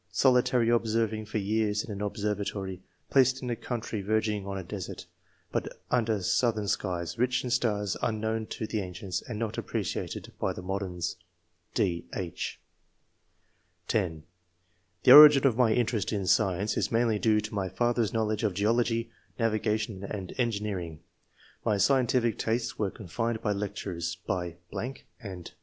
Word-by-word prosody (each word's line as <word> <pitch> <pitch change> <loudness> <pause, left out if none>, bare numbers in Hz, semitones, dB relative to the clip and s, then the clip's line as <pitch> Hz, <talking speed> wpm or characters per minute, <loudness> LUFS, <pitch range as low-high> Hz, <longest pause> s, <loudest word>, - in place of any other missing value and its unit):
Solitary 125 -2 +3
observing 110 -2 +1
for 110 - -3
years 105 0 0
in - - -8
an 100 0 -5
observatory, 100 -2 -3 0.3
placed 130 -1 +4
in 125 - -2
a - - 0
country 115 -2 -4
verging 105 0 0
on 100 0 -3
a 95 - -4
desert, 95 0 -6 0.5
but - - -3
under 110 -5 +1
southern 110 +1 +1
skies, 90 -3 -2
rich 125 +1 +2
in 125 - -3
stars 105 -5 +1
unknown 110 0 -1
to 110 - -4
the 110 0 -2
ancients 95 0 -4
and 115 - -6
not 110 -1 -2
appreciated - - -4
by - - 0
the 90 - -8
modems." 95 -2 -3 0.6
{d, 85 -3 0
h) 90 -4 -4 1.3
(10) 85 -8 -1 0.8
"The - - +7
origin 145 -1 +11
of 130 -5 +4
my 120 -2 +4
interest 115 -2 +1
in 100 -3 -1
science 95 +2 +2
is - - 0
mainly 115 -2 +2
due 110 -1 +3
to 105 +1 -5
my 95 -2 -1
father's 120 +3 +1
knowledge 110 -2 0
of 105 -4 0
geology, 115 +2 +1 0.3
navigation, 110 -3 0
and 95 -2 -5
engineering. 100 -9 -2 0.6
My 105 - +2
scien 125 +5 +3
tij&c 120 -2 +1
tastes 115 +2 -1
were 105 -2 +1
confirmed 115 +5 -3
by 105 - +1
lectures, 95 -4 -3
by.... 90 -2 -2 0.6
and 95 -7 -8
105 Hz, 150 wpm, -29 LUFS, 95-115 Hz, 1.3 s, origin